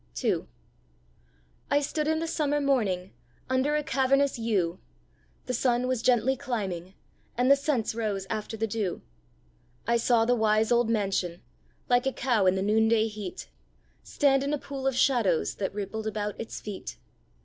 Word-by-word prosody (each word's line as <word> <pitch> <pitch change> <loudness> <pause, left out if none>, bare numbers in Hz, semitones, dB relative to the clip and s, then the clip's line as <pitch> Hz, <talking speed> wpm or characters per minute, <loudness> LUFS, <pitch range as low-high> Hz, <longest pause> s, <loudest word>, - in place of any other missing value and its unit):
II. - - 0 1.2
I 285 - +4
stood 300 +1 -2
in 315 0 +2
the 325 - -2
summer 295 -2 0
morning 210 -10 0 0.4
Under 265 +3 +2
a 300 - 0
cavernous 275 -2 +2
yew; 195 -7 0 0.7
The 250 - -3
sun 245 0 +1
was 255 -2 0
gently 250 +2 +3
climbing, 195 -9 -4 0.4
And 250 +2 +4
the - - +9
scents 275 -6 -1
rose 210 -4 -2
after 215 +2 -4
the 225 - 0
dew. 210 -4 -3 0.8
I 235 0 +2
saw 235 -1 +3
the 245 - +3
wise 220 -1 +2
old 240 -1 +3
mansion, 195 -5 -1 0.4
Like 245 0 +3
a 265 - 0
cow 235 -7 +1
in 185 - +4
the 190 - -1
noonday 220 +1 +3
heat, 210 -4 -7 0.5
Stand 270 -2 +2
in 285 +2 0
a - - -3
pool 270 -1 -5
of 270 - +1
shadows 230 - +2
That 195 - -2
rippled 210 +2 -4
about 210 -1 -2
its 225 - -6
feet. 190 - -7
230 Hz, 160 wpm, -27 LUFS, 210-265 Hz, 1.2 s, the